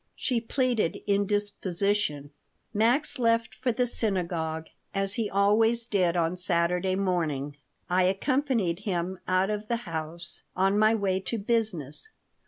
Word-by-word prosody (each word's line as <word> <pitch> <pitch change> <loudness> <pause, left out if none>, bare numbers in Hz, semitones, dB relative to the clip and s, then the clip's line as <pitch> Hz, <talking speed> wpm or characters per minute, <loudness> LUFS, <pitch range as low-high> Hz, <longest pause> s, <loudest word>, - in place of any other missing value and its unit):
She 245 -3 0
pleaded 240 -5 0
indisposition 200 -6 0 0.4
Max 240 +8 +2
left 230 -1 +2
for 255 -1 -1
the 250 +2 +1
synagogue, 170 -8 -1 0.3
as 195 0 0
he 215 -1 -1
always 225 +4 +3
did 180 -6 +1
on 170 +1 +1
Saturday 180 +1 +1
morning. 160 -7 -1 0.3
I 180 +1 +3
accompanied 225 - +1
him 185 -2 -2
out 185 +2 +2
of 210 0 -3
the 235 0 -2
house, 165 0 -5
on 195 +2 +2
my 215 +1 +5
way 195 -3 0
to 190 +5 -3
business. 210 - 0
195 Hz, 130 wpm, -27 LUFS, 175-225 Hz, 0.4 s, my